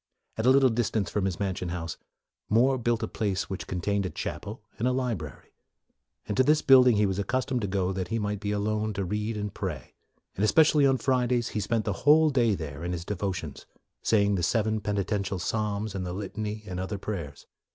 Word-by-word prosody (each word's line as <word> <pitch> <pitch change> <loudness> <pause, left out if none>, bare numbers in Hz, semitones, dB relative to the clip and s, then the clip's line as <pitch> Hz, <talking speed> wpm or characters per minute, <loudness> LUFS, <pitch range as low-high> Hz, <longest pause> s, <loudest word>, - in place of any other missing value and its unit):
At 110 +2 -1
a - - +8
little 135 0 +6
distance 110 -5 -1
from 100 -2 0
his 95 -4 -2
mansion 95 -2 -2
house, 85 -2 -4 0.5
More 125 +4 +3
built 120 -1 0
a - - -1
place 100 -3 -2
which 95 - -5
contained 100 +3 -1
a 95 - -2
chapel 105 +5 -6 0.2
and 120 - +1
a - - +2
library; 115 - -4 0.7
and 105 - -2
to - - +6
this 150 +3 +3
build 130 -1 +7
ing 120 - +5
he 105 0 +3
was 95 0 -1
accustomed 130 +4 -1
to 100 - -1
go 95 -1 0
that 95 -1 -3
he 115 - -1
might 105 -2 -2
be 105 0 -4
alone 105 +1 -1
to 100 -1 -2
read 105 +3 -2
and 105 0 -4
pray; 90 - -5 0.4
and 100 - -2
especially 150 +4 +5
on 135 -1 +3
Fridays, 125 -2 +1
he 110 - -3
spent 110 +1 -1
the 105 - 0
whole 155 +1 +6
day 120 -6 +3
there, 75 -2 -6
in 90 +1 -2
his 85 -1 -5
devotions, 95 -6 -4 0.3
saying 100 -2 +3
the 95 - 0
seven 110 +4 +1
peni 100 -1 -1
tential 100 -1 -2
psalms 105 +2 -2
and 95 -1 -3
the 90 -1 -4
litany 105 +2 -5
and 90 -3 -5
other 95 +2 -3
prayers. 85 -9 -6
105 Hz, 215 wpm, -27 LUFS, 95-115 Hz, 0.7 s, a